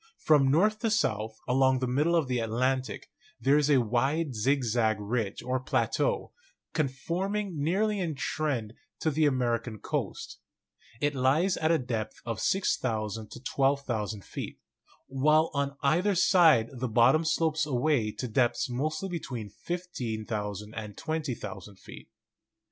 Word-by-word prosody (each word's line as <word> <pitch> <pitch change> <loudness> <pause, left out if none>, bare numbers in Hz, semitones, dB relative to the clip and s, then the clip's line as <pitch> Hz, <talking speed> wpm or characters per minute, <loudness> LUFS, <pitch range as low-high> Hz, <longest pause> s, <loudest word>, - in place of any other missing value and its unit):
From 145 -4 +4
north 210 +9 +3
to 225 - 0
south, 110 - 0
along 130 +1 +3
the 130 - -1
middle 145 +7 +2
of 160 -5 +2
the 125 -1 0
Atlantic, 130 +3 -1 0.3
there 135 +2 +3
is 150 0 +1
a 140 -3 +5
wide 135 +6 0
zigzag 115 -2 +1
ridge 105 -1 -2
or 130 +1 -1
plateau, 470 - 0 0.4
con 155 -3 +1
forming 185 +6 -3
nearly 205 +7 +1
in 165 -5 -2
trend 130 -7 -2 0.3
to 160 - +1
the 155 +1 +3
American 120 -4 -1
coast. - - -4 0.6
It 145 0 +1
lies 145 +8 +2
at 160 - 0
a 165 - +4
depth 120 -5 -3
of 115 -2 -3
6,000 110 - -1
to - - -9
12,000 130 -7 -1
feet, - - -6 0.5
while 150 +4 +2
on 140 -1 -1
either 175 +8 +2
side 165 - +5
the 130 -1 -3
bottom 120 +8 +4
slopes 160 -1 +1
away 125 -4 +1
to 125 - -5
depths 120 +1 +1
mostly 155 +9 -2
between 130 - -5
15,000 110 - -4
and 105 -2 -7
20,000 115 - -4
feet. - - -13
135 Hz, 140 wpm, -29 LUFS, 115-155 Hz, 0.6 s, a